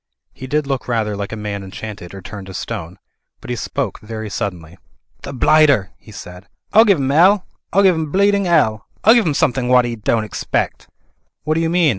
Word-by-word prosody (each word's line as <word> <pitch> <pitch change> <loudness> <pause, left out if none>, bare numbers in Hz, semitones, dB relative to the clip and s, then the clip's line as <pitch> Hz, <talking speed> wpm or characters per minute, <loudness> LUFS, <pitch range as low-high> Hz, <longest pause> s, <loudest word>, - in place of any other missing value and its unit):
He 130 - -9
did 150 +2 0
look 135 -2 -3
rather 110 -4 -1
like 100 0 -5
a - - -4
man 105 -1 -4
enchanted 95 -1 -8
or 95 - -10
turned 95 0 -9
to 95 - -9
stone. 95 -4 -6 0.4
But - - -8
he - - -1
spoke 115 - -3
very 110 -1 -7
suddenly. 90 -5 -5 0.4
"The - - -7
blighter 140 -5 +3
!" - - -38
he - - -15
said, 90 +2 -11 0.3
"I'll 220 +2 +7
give 200 -5 +4
'im 135 -1 -1
'ell. 185 +6 +4 0.3
I'll 200 - +3
give 190 -2 +6
'im 160 -3 -3
bleeding 200 +1 +2
'ell. 115 -11 +2 0.2
I'll 220 - +7
give 235 -6 +3
'im 150 - 0
somethink 125 -2 +1
wot 125 -1 +5
'e 120 -1 -3
don't 110 +1 0
expect." 110 - -3 0.5
"What 155 - 0
do 160 - 0
you 165 - 0
mean?" 170 -2 +3
120 Hz, 215 wpm, -18 LUFS, 105-160 Hz, 0.5 s, I'll